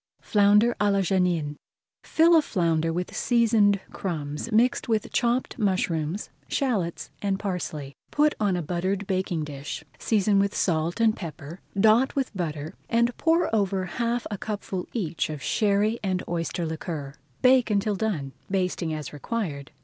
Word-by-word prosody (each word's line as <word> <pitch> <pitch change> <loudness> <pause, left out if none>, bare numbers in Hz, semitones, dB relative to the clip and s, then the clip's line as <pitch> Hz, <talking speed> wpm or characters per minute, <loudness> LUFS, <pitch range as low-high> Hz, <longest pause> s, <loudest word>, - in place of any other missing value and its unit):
FLOUNDER 210 +3 +4
À 205 0 +4
LA 200 0 +2
JANIN 175 -6 +1 0.5
Fill 335 +1 +4
a 320 - +7
flounder 165 - 0
with 180 +2 -3
seasoned 220 -4 +3
crumbs 155 +2 -4
mixed 235 +3 +2
with 220 -2 0
chopped 245 +2 0
mushrooms, 185 -3 -1 0.2
shallots, 210 - -1
and 195 -1 0
parsley. 165 -8 -4
Put 300 0 +3
on 205 -3 +2
a 175 - -2
buttered 185 +5 -1
baking 185 -4 -1
dish, 145 +1 -6 0.2
season 205 -2 +2
with 200 0 +1
salt 165 +2 0
and 225 -1 +4
pepper, 160 0 -8 0.2
dot 220 +6 +4
with 265 -6 -1
butter, 155 -2 -3 0.2
and 235 +1 +2
pour 325 -7 +2
over 195 -2 +1
half 235 +5 -1
a 205 - -4
cupful 200 -3 -4
each 170 -10 -2
of 150 -3 -6
Sherry 210 +2 +2
and 185 -2 -1
oyster 170 0 -2
liquor. 160 -3 -5 0.3
Bake 255 -1 +5
until 210 0 +1
done, 180 -10 -2 0.2
basting 180 -4 -1
as 150 -3 -6
required. 150 -4 -4
195 Hz, 150 wpm, -26 LUFS, 165-220 Hz, 0.5 s, a